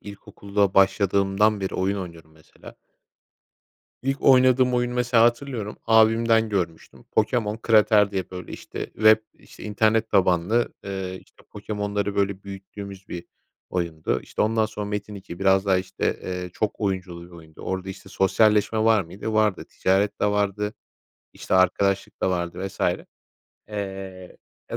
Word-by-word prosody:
ilkokula 100 -1 -3
başladığımdan 100 +1 +3
beri 95 - -3
oyun 100 +2 0
oynuyorum 85 -4 -9
mesela. 80 -1 -16 1.3
İlk 135 +2 -2
oynadığım 130 -1 +5
oyunu 125 0 0
mesela 125 -2 +3
hatırlıyorum, 120 -3 -1
abimden 110 0 +4
görmüştüm. 90 -6 -4
Pokémon 110 -3 +1
Crater 105 -2 +5
diye 95 -2 -4
böyle, 90 -1 -8
işte, - - -7 0.5
işte, - - -16
internet 110 +1 +1
tabanlı, 95 +4 +2
eee, 95 -1 -5
işte, - - -24
pokemonları, 105 -1 -3
böyle, 100 -1 0
büyüttüğümüz 100 0 -9
bir 85 -1 -6 0.5
oyundu. 80 -7 -2
İşte, - - -3
ondan 110 0 +2
sonra 105 -1 -6
Metin2 100 -3 -9
biraz 95 0 +3
daha, 95 -1 +3
işte, 95 - -3
eee, 90 -1 -5
çok 110 +2 -3
oyunculu 90 -4 -3
bir - - -19
oyundu. 80 -2 -14
Orada, 95 0 -4
işte, 95 0 -9
sosyalleşme 105 +3 +2
var 110 -2 +4
mıydı? 95 +6 -6
Vardı. 110 -3 +1
Ticaret 100 +2 0
de - - +3
vardı, 105 +1 -1 0.6
işte, - - -4
arkadaşlık 95 +2 +1
da - - +2
vardı 90 +1 -2
vs. 95 - -14 0.9
Eee, 95 -3 -7 0.3
e, - - -3
100 Hz, 135 wpm, -24 LUFS, 95-110 Hz, 1.3 s, oynadığım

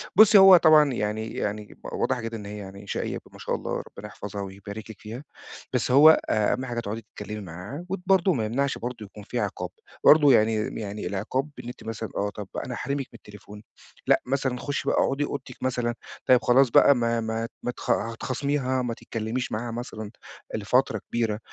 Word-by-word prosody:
بُصّي 215 +2 +8
هو 190 -1 +10
طبعًا 155 -4 +6
يعني 110 0 -3
يعني 105 +1 -3
ب - - -19
واضح 130 -1 0
جدًا 115 0 -5
إن 105 - -9
هي 105 +1 -7
يعني 100 0 -10
شقيّة - - -3
ب - - -11
ما - - -13
شاء - - -2
الله - - -5
ربنا 105 - -6
يحفظها 105 -1 -7
ويبارك 100 +3 -8
لِك 110 - -15
فيها، 115 +5 -8 0.5
بس - - 0
هو 150 +5 +8
أهم 125 +5 +1
حاجة 120 -2 -3
تُقعدي 115 0 -4
تتكلّمي 105 -1 -8
معاها 95 - -8
وت 195 - -2
برضه 190 -1 +4
ما 115 -7 -1
يمنعش 135 +5 -1
برضه 125 +1 -5
يكون 105 +1 -12
في - - -4
عقاب، - - -3 0.4
برضه 145 -2 +8
يعني 110 +1 +4 0.3
يعني 105 0 -5
العقاب 120 +9 -2
إن - - -8
أنتِ 125 - -9
مثلًا 110 0 -5
آه، 100 - 0
طب 100 -1 -8 0.2
أنا 125 - -5
هاحرمِك 140 +4 -2 0.2
من - - -12
التليفون، 105 -1 -13 0.4
لأ - - +4
مثلًا 130 -1 0
خُشّي 145 +2 -2
بقى - - +1
أقعُدي 145 +2 +1
أوضتِك 140 -3 -6
مثلًا، 120 -2 -1 0.3
طيب 125 -1 +6
خلاص 130 +1 +5
بقى 140 +4 +6
ما 115 -1 0
ما 110 +1 -2 0.2
ما 125 - -1
تخ - - -3 0.3
هتخاصميها 130 -1 -1
ما 120 -2 -2
تتكلّميش 115 +2 -4
معاها 115 +2 -3
مثلًا 110 -3 -6 0.4
لفترة - - +1
كبيرة، 115 -3 -1
115 Hz, 195 wpm, -26 LUFS, 105-130 Hz, 0.5 s, هو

